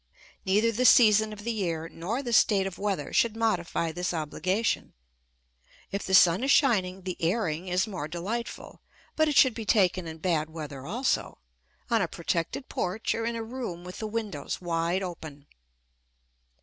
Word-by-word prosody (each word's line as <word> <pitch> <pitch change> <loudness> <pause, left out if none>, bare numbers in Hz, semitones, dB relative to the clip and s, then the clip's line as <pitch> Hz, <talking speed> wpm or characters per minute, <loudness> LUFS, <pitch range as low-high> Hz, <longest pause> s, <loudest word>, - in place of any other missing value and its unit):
Neither 210 +4 +3
the 235 +3 -1
season 220 -4 +6
of 210 -1 -9
the 235 - -1
year 170 -7 -2
nor 200 +12 -4
the 240 -2 -3
state 200 -3 +4
of 195 -2 -6
weather 195 -8 -2
should 230 -2 +2
modify 175 -7 0
this 180 +1 -3
obligation. 185 +7 -1 1.0
If 200 +1 -2
the 190 - +4
sun 180 +4 +6
is 270 - 0
shining 190 -10 +3
the 185 -1 -4
"airing" 175 -1 -1
is 180 +1 +1
more 180 -8 -5
delightful, 195 +9 -5 0.3
but 315 0 +3
it 295 - -1
should 260 -3 +6
be 225 - -5
taken 185 -5 +2
in 160 0 -7
bad 160 -2 0
weather 150 -4 -8
also, 245 +8 -1 0.5
on 230 -2 +3
a 180 - +1
protected 170 - -3
porch 185 +5 -2
or 225 - -2
in 235 - -2
a 230 - -3
room 225 -7 -6
with 180 0 -9
the 220 - -3
windows 210 -9 -4
wide 170 +1 -1
open. 160 -5 -8
190 Hz, 170 wpm, -27 LUFS, 170-225 Hz, 1.0 s, season